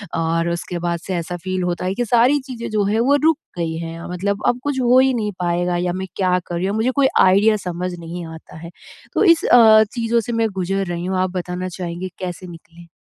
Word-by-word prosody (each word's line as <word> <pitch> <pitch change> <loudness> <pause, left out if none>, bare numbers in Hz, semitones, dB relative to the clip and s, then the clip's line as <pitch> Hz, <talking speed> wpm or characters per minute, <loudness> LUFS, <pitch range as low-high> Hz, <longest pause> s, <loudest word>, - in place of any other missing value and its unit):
और 165 +1 0
उसके 170 0 -4
बाद 170 -1 -2
से 185 - -2
ऐसा 175 +1 -4
फ़ील 185 -1 -2
होता 180 0 -2
है 190 +1 -1
कि 245 - -1
सारी 245 +5 +3
चीज़ें 235 -3 -6
जो 210 -1 +1
हैं, 215 +3 +1
वो 275 +4 +3
रुक 320 -2 +4 0.2
गई 160 -1 -2
हैं, 165 0 -6
मतलब 200 +3 -2
अब 245 - +1
कुछ 285 -2 -1
हो 250 +1 +5
ही 265 0 +3
नहीं 210 -3 -2
पाएगा 175 0 0
या 175 0 -1
मैं 190 +1 -4
क्या 180 -2 +2
कर 175 - -4
रही 175 +2 -1
हूँ, 200 - -2
मुझे 240 +4 +1
कोई 265 - +5 0.2
आईडिया 205 +4 +4
समझ 180 +1 -3
नहीं 170 +1 -7
आता 160 - -13
है। 170 +1 -9 0.4
तो - - +2
इस 335 -2 +5
अ, 220 -2 +7
चीज़ों 235 -1 +1
से 240 - -5
मैं 225 -1 +1
गुज़र 195 +2 -1
रही 175 0 -4
हूँ। 185 0 -1
आप 185 -1 0
बताना 180 +1 -4
चाहेंगे 180 +1 -5
कैसे 180 0 -6
निकलें? 170 0 -14
185 Hz, 235 wpm, -20 LUFS, 175-225 Hz, 0.4 s, अ